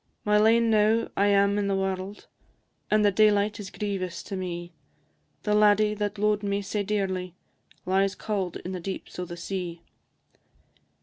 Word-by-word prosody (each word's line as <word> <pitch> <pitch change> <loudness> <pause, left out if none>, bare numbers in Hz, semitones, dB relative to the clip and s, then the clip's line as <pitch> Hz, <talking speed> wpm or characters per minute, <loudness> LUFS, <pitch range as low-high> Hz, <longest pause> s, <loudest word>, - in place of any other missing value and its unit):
My 210 0 +4
lane 225 +1 +4
now 220 +1 +3
I 200 - +3
am 200 0 +3
i' - - +1
the 200 -1 0
warld, 190 +1 -3 0.6
And 210 0 +3
the 205 - +5
daylight 210 +1 +3
is 200 -2 -6
grievous 195 -4 -4
to 195 - -6
me; 175 -2 -5 0.7
The 210 - +1
laddie 210 0 +4
that 210 0 -3
lo'ed 210 0 +1
me 200 0 -1
sae 205 +2 -2
dearly 190 -3 -2 0.5
Lies 195 +1 +1
cauld 195 -5 -3
in 185 - -4
the 185 - -4
deeps 190 +1 -6
o' 180 - -2
the 175 0 -8
sea. 175 -2 -5
200 Hz, 165 wpm, -26 LUFS, 185-210 Hz, 0.7 s, the